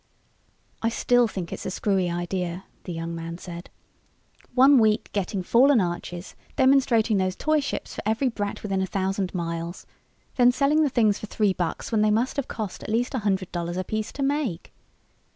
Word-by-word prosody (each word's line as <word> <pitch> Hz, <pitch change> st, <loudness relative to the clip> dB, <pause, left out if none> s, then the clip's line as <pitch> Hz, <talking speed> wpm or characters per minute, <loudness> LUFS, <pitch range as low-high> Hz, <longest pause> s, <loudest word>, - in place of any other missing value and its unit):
"I 230 Hz, -, +2 dB
still 245 Hz, +1 st, +3 dB
think 185 Hz, -6 st, -5 dB
it's -, -, -6 dB
a -, -, -1 dB
screwy 190 Hz, -2 st, 0 dB
idea," 175 Hz, +1 st, -3 dB, 0.2 s
the 180 Hz, -, -5 dB
young 165 Hz, 0 st, -4 dB
man 165 Hz, 0 st, -5 dB
said. 175 Hz, -1 st, -9 dB, 0.9 s
"One 265 Hz, +1 st, +7 dB
week 215 Hz, -1 st, +2 dB
getting 195 Hz, -1 st, -2 dB
fallen 255 Hz, +6 st, +5 dB
arches, 175 Hz, 0 st, -4 dB, 0.2 s
demonstrating 260 Hz, -5 st, +4 dB
those 185 Hz, -1 st, 0 dB
toy 310 Hz, +6 st, +1 dB
ships 280 Hz, -, -4 dB
for -, -, -5 dB
every 220 Hz, +6 st, +1 dB
brat 205 Hz, -4 st, -3 dB
within 195 Hz, -2 st, -1 dB
a 190 Hz, -, -1 dB
thousand 190 Hz, 0 st, -1 dB
miles. 170 Hz, 0 st, -4 dB, 0.5 s
Then 245 Hz, -1 st, +6 dB
selling 280 Hz, +4 st, +2 dB
the 300 Hz, -, +3 dB
things 220 Hz, -5 st, +2 dB
for 215 Hz, -, -7 dB
three 210 Hz, -2 st, +1 dB
bucks 175 Hz, +3 st, -3 dB
when 220 Hz, -2 st, +2 dB
they 215 Hz, -, +4 dB
must 230 Hz, +7 st, +1 dB
have 280 Hz, -, -1 dB
cost 210 Hz, -5 st, -5 dB
at -, -, -7 dB
least 235 Hz, +4 st, 0 dB
a 260 Hz, -, 0 dB
hundred 195 Hz, -3 st, -1 dB
dollars 175 Hz, 0 st, -3 dB
apiece 215 Hz, +4 st, -3 dB
to 275 Hz, -, -3 dB
make." 275 Hz, -, -2 dB
205 Hz, 185 wpm, -25 LUFS, 180-245 Hz, 0.9 s, One